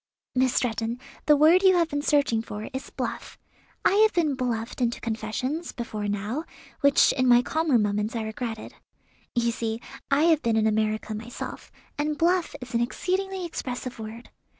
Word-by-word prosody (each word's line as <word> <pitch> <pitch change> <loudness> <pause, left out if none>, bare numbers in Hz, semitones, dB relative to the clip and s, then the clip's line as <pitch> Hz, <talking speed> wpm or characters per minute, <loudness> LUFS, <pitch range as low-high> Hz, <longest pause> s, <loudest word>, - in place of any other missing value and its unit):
"Miss 255 0 +2
Stretton, 230 0 -1 0.3
the 300 - +7
word 320 +5 +6
you 380 -1 +6
have 340 -2 +2
been 290 0 -1
searching 285 -6 +2
for 215 -1 -6
is 265 - -5
'bluff.' - - -5 0.5
I - - +6
have 435 0 +5
been 320 -5 +2
bluffed 245 -2 -3
into 235 -1 0
confessions, 235 +8 -3
before 215 -3 -4
now, 205 +9 -2 0.4
which 280 0 +5
in 255 -1 +1
my 245 0 +6
calmer 315 -4 +2
moments 210 +1 0
I 225 - -1
regretted. 220 0 -5 0.6
You 235 0 +2
see 225 -1 -3 0.3
I 280 +2 +3
have 325 -2 +4
been 230 -1 +1
in 220 - +3
America 215 0 0
myself, 225 +3 -7 0.3
and 300 0 0
'bluff' 350 +2 +2
is 250 -1 -9
an 235 - +2
exceedingly 375 +8 -1
expressive 255 -6 -5
word. 220 +2 -8
245 Hz, 170 wpm, -26 LUFS, 225-300 Hz, 0.6 s, the